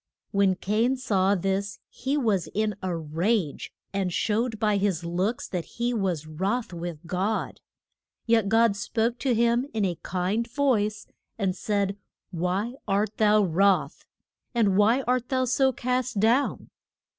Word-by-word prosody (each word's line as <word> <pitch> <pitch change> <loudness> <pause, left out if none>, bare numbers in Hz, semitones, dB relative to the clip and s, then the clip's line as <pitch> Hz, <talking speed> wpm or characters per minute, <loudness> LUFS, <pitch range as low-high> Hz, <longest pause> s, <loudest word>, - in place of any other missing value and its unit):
When 200 -2 +3
Cain 220 +8 +1
saw 200 -6 +2
this 195 +2 -1
he 270 +4 -2
was 215 - +1
in 215 0 +1
a 185 -3 -2
rage, 165 +2 -1 0.2
and 195 -2 -1
showed 220 +4 0
by 210 -2 +2
his 195 -4 0
looks 185 +7 -1
that 180 -3 -3
he 240 +1 0
was 185 -8 -1
wroth 190 +8 -2
with 170 -2 -6
God. 190 +6 -2 0.6
Yet 225 -3 +3
God 225 -1 +4
spoke 230 +3 -1
to 260 -4 +1
him 235 +3 +2
in 210 -2 +1
a 175 -3 -2
kind 190 +6 -1
voice, 230 -5 0 0.3
and 195 -4 0
said, 200 0 -1 0.3
Why 185 +6 -1
art 205 +2 0
thou 210 -1 +4
wroth? 195 +2 +2 0.5
and 210 -5 +3
why 225 +6 +4
art 250 0 0
thou 255 -1 +1
so 265 +2 +3
cast 250 -2 -1
down? 235 +7 +1
210 Hz, 145 wpm, -26 LUFS, 190-235 Hz, 0.6 s, God